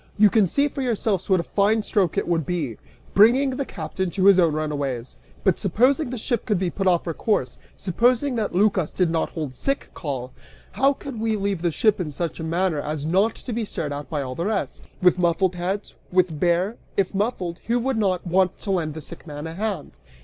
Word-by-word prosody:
You 210 -1 +6
can 215 -4 +4
see 280 - +2
for 280 - -5
yourselves 220 -6 -1
what 190 -2 +4
a - - -1
fine 210 +4 +2
stroke 190 -6 +1
it - - 0
would 170 -2 +1
be, 150 -9 -3 0.4
bringing 250 +7 +5
the 270 +2 -2
captain 190 -7 -4
to 190 +2 0
his 195 -2 +7
own 170 -3 +4
runaways! 145 -5 -3 0.3
But, 190 -4 +2
supposing 255 - +2
that - - -7
the - - -3
ship 235 0 -1
could 210 - +2
be 180 -1 -1
put 195 +2 -1
off 175 -2 +3
her 165 - -2
course, 155 - -1 0.2
supposing 245 - +1
that 220 -6 -2
Lycas 190 -4 +2
did 180 -3 +1
not 165 -1 0
hold 150 -6 -5
sick 275 - -2
call, 130 -5 -5 0.4
how 275 +1 +3
could 270 -4 -8
we 220 0 0
leave 200 -3 -1
the 175 - +2
ship 205 +4 +2
in 155 -4 -3
such 170 +4 -4
a - - -4
manner 165 0 0
as 150 0 -4
not 195 +7 +2
to 245 - -6
be 230 +1 -1
stared 155 -8 -4
at 145 -2 -6
by 150 -3 -2
all 130 -1 -5
the 170 +8 -2
rest? 210 -3 -2 0.2
With 180 0 +5
muffled 175 +1 +2
heads? 185 +3 -3 0.2
With 180 -4 +2
bare? 180 +6 +1 0.2
If 195 -1 +1
muffled, 190 -4 -2
who 235 +1 +2
would 255 0 0
not 190 -4 0
want 185 +1 +2
to 200 - -3
lend 160 -5 -1
the 160 - -6
sick 170 +3 -11
man 150 0 -6
a 160 - -5
hand? 195 -3 -4
185 Hz, 225 wpm, -24 LUFS, 165-215 Hz, 0.4 s, his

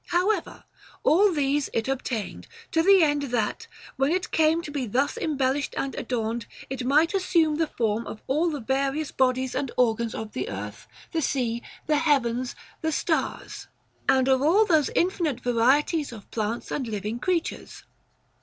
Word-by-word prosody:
However, 365 +2 0 0.4
all 390 +5 +5
these 290 -2 0
it 225 +1 -1
obtained, 255 -5 -3 0.2
to 325 - +3
the 385 +1 +6
end 290 -1 +2
that, 240 - -1 0.3
when 270 +3 +2
it 365 +1 -1
came 320 +1 +3
to 300 - -7
be 275 -4 -2
thus 270 +7 0
embellished 280 -2 -1
and 275 - -2
adorned, 230 -1 -3 0.2
it 265 -1 -3
might 300 +7 +3
assume 335 -5 +2
the 325 -1 +1
form 225 -4 -1
of 215 - -7
all 310 +6 +1
the 295 -4 -4
various 275 +4 -1
bodies 260 0 +1
and 275 - -2
organs 235 -2 +1
of 220 -1 -5
the 130 - -3
earth, 105 +3 -7 0.2
the 325 - 0
sea, 240 -5 -1 0.2
the 305 -1 +2
heavens, 255 -5 +1 0.3
the 320 - 0
stars, - - -2 0.4
and 260 -1 +4
of 265 -1 +3
all 360 +10 +4
those 315 -7 +3
infinite 340 -7 +1
varieties 265 +6 +2
of 220 -4 -12
plants 225 +1 -3
and 265 -4 -2
living 210 +2 -3
creat 350 +2 0
ures. - - -12
270 Hz, 165 wpm, -26 LUFS, 235-315 Hz, 0.4 s, the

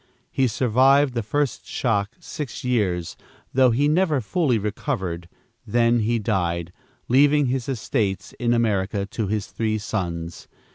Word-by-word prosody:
He 130 - +2
survived 130 +4 +3
the 120 - -1
first 140 +6 -2
shock 105 -3 -1
six 150 -6 -6
years, 95 -10 0 0.4
though 130 -1 +5
he 135 +5 +2
never 155 -2 +2
fully 130 - +1
recovered, 95 -4 -3 0.3
then 120 +2 +2
he 115 +2 +1
died, 90 -5 -1 0.3
leaving 145 +3 +4
his 130 0 -2
estates 110 -5 -2
in 120 -1 +1
America 100 -4 +1
to 105 +1 -3
his 105 0 -1
three 110 -1 -2
sons. 85 -5 -4
115 Hz, 135 wpm, -23 LUFS, 100-130 Hz, 0.4 s, though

